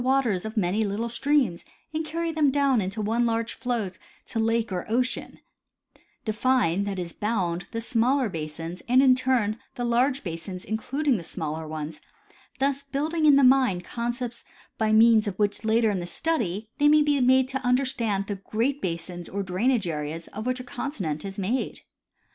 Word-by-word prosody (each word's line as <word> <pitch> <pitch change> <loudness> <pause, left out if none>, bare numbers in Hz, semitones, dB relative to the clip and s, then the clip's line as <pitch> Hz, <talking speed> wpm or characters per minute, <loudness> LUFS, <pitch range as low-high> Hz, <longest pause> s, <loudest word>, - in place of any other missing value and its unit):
waters 250 -8 +1
of 220 +1 -6
many 200 +2 +1
little 215 +3 -2
streams 260 -6 +1 0.3
and 315 +1 -1
carry 330 +2 -2
them 305 -3 +3
down 275 -4 +3
in 185 - -1 0.2
one 230 +3 +1
large 230 0 0
flow 240 -6 -2 0.3
to 225 - -4
lake 225 0 +1
or 180 -1 -2
ocean; 250 +3 -1 0.9
define, 215 -4 +1
that 200 -1 -3
is 175 -2 -4
bound, 185 -5 -1
the 230 - -4
smaller 245 +3 +2
basins 165 0 -6
and 255 +2 +6
in 260 -2 +7
turn 250 -4 +1 0.2
the 245 - -2
large 255 +3 +2
basins 180 +2 -6
including 265 +5 0
the 175 - -6
smaller 160 -1 -4
ones, 155 -1 -6 0.6
thus 275 0 0
building 305 +3 0
in 290 - +8
the 280 - +5
mind 255 -9 +4
concepts 240 +2 -4 0.3
by 220 -1 +1
means, 220 0 +6
of 195 -2 -3
which 205 -1 +1
in 220 - -6
later 220 -5 +2
study 220 - -1
they 290 - +5
may 300 0 +6
be 290 -2 +2
made 260 +1 +4
to 265 0 -3
understand 245 -6 +1
the 200 0 -4
great 235 +8 -1
basins 175 0 -4
or 200 +1 -3
drainage 210 +5 +1
areas 155 +1 -4
of 215 +4 -6
which 255 0 0
a - - -6
continent 245 - -4
is 195 -1 -6
made. 210 +7 -2
230 Hz, 175 wpm, -26 LUFS, 190-260 Hz, 0.9 s, in